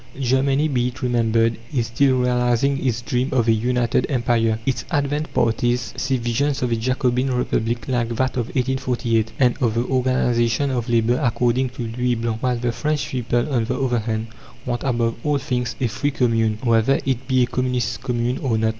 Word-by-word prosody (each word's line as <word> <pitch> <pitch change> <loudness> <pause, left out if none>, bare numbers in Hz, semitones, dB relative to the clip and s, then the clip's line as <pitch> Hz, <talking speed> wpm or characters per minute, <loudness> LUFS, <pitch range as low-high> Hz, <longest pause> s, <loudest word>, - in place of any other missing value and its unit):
Germany, 135 +3 +2
be 125 -4 0
it 125 0 -7
remembered, 115 -2 +2
is 125 -6 0
still 130 +2 +2
realizing 125 +2 +1
its 120 -3 -1
dream 125 0 -1
of 120 -3 +1
a - - +5
United 120 +1 +1
Empire. 120 -4 +1
Its 125 -3 -1
advanced 145 0 -1
parties 120 0 0
see 130 +1 0
visions 125 +4 -1
of 125 - 0
a - - +3
Jacobin 125 +2 0
Republic 120 -2 -1
like 120 -3 0
that 130 +2 +1
of 120 -3 -2
1848, 120 -4 -1
and 125 -3 +3
of 115 -3 +1
the 120 +1 0
organization 125 0 +1
of 120 -3 -2
labour 120 +2 +2
according 120 +1 +1
to 120 - -6
Louis 120 +2 -1
Blanc; 115 -1 -3
while 125 -1 0
the 120 0 -1
French 150 +5 -2
people, 120 -1 -1
on 115 -3 +1
the - - -2
other 125 -3 +1
hand, 110 0 -3 0.4
want 120 -2 -2
above 120 -4 0
all 150 -1 +1
things 125 -3 -2
a 130 - 0
free 120 +5 -1
Commune, 115 -5 +1
whether 115 +2 +3
it 130 -1 -1
be 130 -1 +3
a - - +3
communist 125 -2 -2
Commune 120 0 -1
or 120 -5 0
not. 110 0 +1
125 Hz, 190 wpm, -21 LUFS, 115-130 Hz, 0.4 s, a